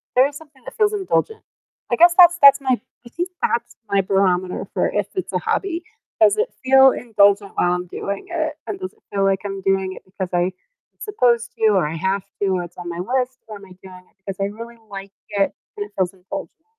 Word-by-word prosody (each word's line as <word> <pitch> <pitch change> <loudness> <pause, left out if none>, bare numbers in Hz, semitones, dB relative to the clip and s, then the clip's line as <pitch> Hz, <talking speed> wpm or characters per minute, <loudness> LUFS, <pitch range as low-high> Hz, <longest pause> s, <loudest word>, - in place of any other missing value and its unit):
there 255 +2 +6
is 290 - -10
something 290 -4 -17
that - - -11
feels 425 -1 +3
indulgent. 420 +2 -1 0.5
I - - +3
guess 345 +1 +7
that's 350 -1 +7
that's 280 0 +8
my 260 -2 +1 0.3
I - - -12
think 350 +8 -3
that's 235 - -1 0.2
my 200 -1 +3
barometer 185 -1 0
for - - +1
if - - -1
it's 375 - -4
a - - +1
hobby, 345 -3 -1 0.4
does 410 - +5
it 450 +3 +1
feel 265 0 +7
indulgent 205 -3 +2
while 175 - +2
I'm 180 0 -3
doing 200 +3 -5
it, - - -2
and - - -4
does 375 +1 -6
it 440 - -31
feel 195 -1 0
like 195 0 +2
I'm 195 -1 -5
doing 190 -1 +1
it - - -13
because 185 -1 -5
I 175 +1 +1 0.5
supposed 240 - +1
to 225 - +1
or 185 -6 +2
I 160 - -5
have 190 +4 0 0.2
to - - +2
or 180 - 0
it's 175 - -12
on 175 -1 -6
my 170 - -6
list 255 +4 -2
or 215 -1 -8
am 200 - -14
I 185 - -15
doing 185 -1 -13
it - - -43
because 195 -1 -6
I 195 - +1
really 230 +2 -10
like 195 0 -8 0.2
it 200 -1 +2 0.3
and 205 - -3
it - - -28
feels 185 -1 0
indulgent? 195 - -9
205 Hz, 230 wpm, -21 LUFS, 190-280 Hz, 0.5 s, that's